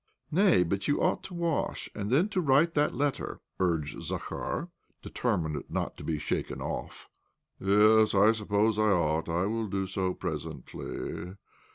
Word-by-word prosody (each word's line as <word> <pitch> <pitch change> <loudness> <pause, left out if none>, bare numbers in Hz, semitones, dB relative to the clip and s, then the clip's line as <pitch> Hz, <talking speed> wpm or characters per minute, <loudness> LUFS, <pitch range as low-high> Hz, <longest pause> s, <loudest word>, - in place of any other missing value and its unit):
" - - -44
Nay, 180 - +5
but 95 +3 -2
you 145 - +2
ought - - +1
to 180 - -8
wash, 170 -3 -1
and 100 -1 -4
then 150 - +4
to 190 -3 0
write 155 +2 +4
that 150 -3 +1
letter," 140 +1 -1 0.2
urged 80 -5 0
Zakhar, - - -4 0.3
deter - - -1
mined 75 -4 -3
not - - -2
to - - -9
be 80 - -1
shaken 75 - -3
off. - - -5 0.3
" - - -50
Yes, 105 +2 +5
I 100 +3 +6
suppose 105 0 +1
I 110 0 +4
ought. 80 -4 +1
I 85 +3 +1
will 110 +1 -1
do 95 -1 -1
so 95 -1 -2
presently. 80 +2 -5
100 Hz, 170 wpm, -29 LUFS, 90-130 Hz, 0.3 s, I